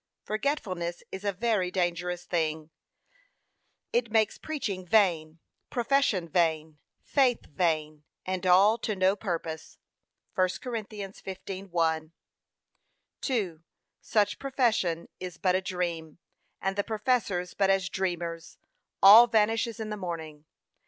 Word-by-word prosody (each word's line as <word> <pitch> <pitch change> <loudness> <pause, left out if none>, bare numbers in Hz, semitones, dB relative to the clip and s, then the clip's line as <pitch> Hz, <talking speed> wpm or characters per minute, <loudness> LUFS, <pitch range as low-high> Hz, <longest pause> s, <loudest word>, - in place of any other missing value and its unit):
Forgetfulness 195 - -2
is 190 +1 -6
a 200 - +1
very 200 -2 0
dangerous 175 -1 -2
thing: 160 -2 -2 1.2
it 235 -1 +1
makes 220 -1 +2
preaching 260 -12 -4
vain, 170 -6 +2 0.3
profession 240 -8 +1
vain, 160 -2 0 0.2
faith 260 -4 +2
vain, 155 -2 -1 0.2
and 185 0 -2
all 200 +5 +5
to 215 -2 -2
no 190 +1 +3
purpose. 165 -6 -5 0.6
(1 185 0 +3
Cor. 250 - -6
15:1, 190 -6 -3 1.1
2) 190 - -2 0.4
Such 205 -1 +1
profession 230 -11 0
is 180 -2 -7
but 185 +1 +1
a 185 - +1
dream, 170 -4 -3 0.4
and 195 0 -1
the 205 - 0
professors 210 -5 -1
but 195 -1 +1
as 195 -1 +2
dreamers: 175 -3 -3 0.5
all 215 +5 +10
vanishes 225 +1 +1
in 215 -1 -4
the 210 - -3
morning. 160 -5 -6
185 Hz, 115 wpm, -28 LUFS, 170-215 Hz, 1.2 s, all